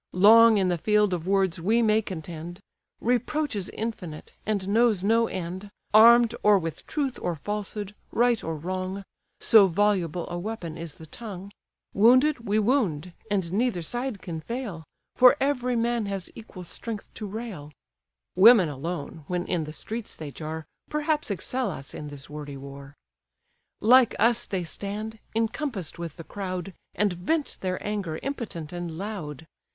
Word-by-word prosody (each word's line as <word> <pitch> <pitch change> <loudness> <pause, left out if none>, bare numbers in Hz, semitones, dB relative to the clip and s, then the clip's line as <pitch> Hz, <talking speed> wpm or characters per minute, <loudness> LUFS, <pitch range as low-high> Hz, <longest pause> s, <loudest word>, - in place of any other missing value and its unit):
Long 225 +3 +8
in 190 -2 +2
the 175 -1 0
field 210 +1 +3
of 175 0 -3
words 190 -3 +1
we 225 +7 +3
may 215 0 +4
contend, 175 -2 -7 0.4
Reproach 250 +4 0
is 195 -3 -3
infinite, 185 -9 -6
and 200 -3 -1
knows 215 -2 +3
no 225 +3 +3
end, 185 +3 -5 0.2
Arm'd 235 +2 +8
or 210 -1 +6
with 165 -3 -5
truth 275 -4 -2
or 175 -1 -1
falsehood, 205 +3 -4 0.2
right 240 -1 +2
or 165 - -3
wrong; 185 +4 -4 0.4
So 215 -4 +7
voluble 180 -3 +1
a 175 0 -4
weapon 180 -5 -5
is 165 -3 -8
the 160 - -12
tongue; 200 +2 -8 0.4
Wounded, 250 +4 +4
we 210 - +3
wound; 200 - +1 0.2
and 190 -4 -1
neither 215 -5 0
side 240 +3 -3
can 165 -3 -5
fail, 225 -5 -5 0.3
For 250 +2 +7
every 250 -3 0
man 235 -2 0
has 195 -3 -5
equal 205 -5 -10
strength 215 +4 -5
to 215 - -6
rail: 200 -8 -7 0.6
Women 195 -2 +7
alone, 150 +2 -5
when 180 -1 -2
in 170 -4 -1
the 155 - -7
streets 225 +7 -5
they 150 -3 -7
jar, 160 +2 -6 0.2
Perhaps 300 -2 0
excel 250 +6 -1
us 135 - -7
in 150 - -6
this 145 -1 -9
wordy 145 -1 -7
war; 140 +1 -10 0.9
Like 245 +2 +6
us 235 +2 +2
they 190 -3 -2
stand, 210 +5 -5 0.2
encompass'd 225 - -2
with 170 -2 -6
the 165 - -8
crowd, 185 0 -5 0.2
And 205 -2 +1
vent 285 - -2
their 185 -1 -1
anger 200 -7 -2
impotent 215 - -5
and 175 -2 -5
loud. 170 -7 -6
200 Hz, 155 wpm, -26 LUFS, 170-230 Hz, 0.9 s, Long